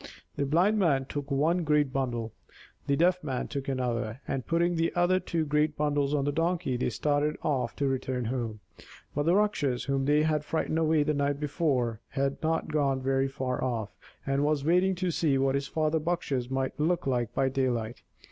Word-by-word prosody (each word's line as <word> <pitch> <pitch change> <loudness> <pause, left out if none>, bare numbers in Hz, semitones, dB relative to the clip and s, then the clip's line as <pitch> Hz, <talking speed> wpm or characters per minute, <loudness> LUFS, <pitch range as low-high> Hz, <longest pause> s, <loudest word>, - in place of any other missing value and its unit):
The 140 -1 -1
Blind 185 +9 +3
Man 140 -8 +2
took 145 +1 -5
one 160 +6 +2
great 150 -3 +2
bundle, 120 -4 -2 0.5
the 140 - +3
Deaf 180 +3 +2
Man 130 -4 -2
took 140 -2 -5
another, 125 -3 -2
and, 135 -3 -3
putting 170 +1 +2
the 165 0 +1
other 175 +1 +3
two 165 -3 -2
great 150 +1 +1
bundles 145 -1 +1
on 140 -1 0
the 145 - +1
Donkey, 165 -3 0
they 125 - 0
started 145 +5 0
off 140 -4 -1
to 140 - 0
return 130 -2 -2
home. 115 -3 -3 0.5
But 145 +2 -1
the 175 - +5
Rakshas, 160 -12 +1
whom 135 0 0
they 150 +2 +3
had 155 -1 +1
frightened 160 +1 -1
away 160 -2 +3
the 150 +1 0
night 140 0 0
before, 140 - 0
had 135 0 -1
not 160 0 0
gone 140 -3 +1
very 135 +1 +1
far 130 -2 -3
off, 115 -5 -2 0.3
and 135 +1 +1
was 150 -1 +1
waiting 180 +3 +3
to 180 0 -1
see 155 -4 +1
what 135 0 +2
his 140 0 -1
father 155 0 0
Bakshas 145 -6 -2
might 135 +1 -2
look 170 +3 +1
like 120 -4 0
by 135 - +2
daylight. 125 -4 -1
145 Hz, 195 wpm, -28 LUFS, 130-160 Hz, 0.5 s, the